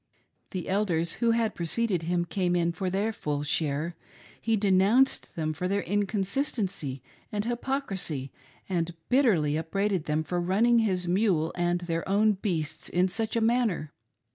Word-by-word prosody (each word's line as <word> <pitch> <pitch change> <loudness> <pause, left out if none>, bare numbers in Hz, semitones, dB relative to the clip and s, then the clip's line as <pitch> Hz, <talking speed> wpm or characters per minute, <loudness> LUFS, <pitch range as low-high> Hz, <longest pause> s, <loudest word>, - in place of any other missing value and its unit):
The 185 -4 -5
Elders 180 -4 0
who 235 - +4
had 230 -2 +2
preceded 180 +2 0
him 175 +1 0
came 180 -1 0
in 170 -1 +2
for 180 +2 -2
their 205 +4 0
full 145 -6 -2
share; 155 +2 -1 0.5
hp 225 -2 +2
denounced 205 +7 +3
them 155 -1 -1
for 180 +4 -2
their 200 +1 0
inconsistency 195 - -1 0.3
and 205 0 -1
hypocrisy, 230 - -3 0.4
and 175 -2 -1
bitterly 190 - +3
upbraided 185 +2 -1
then! 155 0 0
for 175 +3 -2
running 220 +7 +3
his 185 -5 +1
mule 175 -4 +2
and 175 0 0
their 170 0 -3
own 210 +2 +4
beasts 180 -7 -3
in 180 +1 +2
such 220 +5 -2
a 230 - +2
manner. 225 -9 +1
185 Hz, 150 wpm, -28 LUFS, 165-215 Hz, 0.5 s, who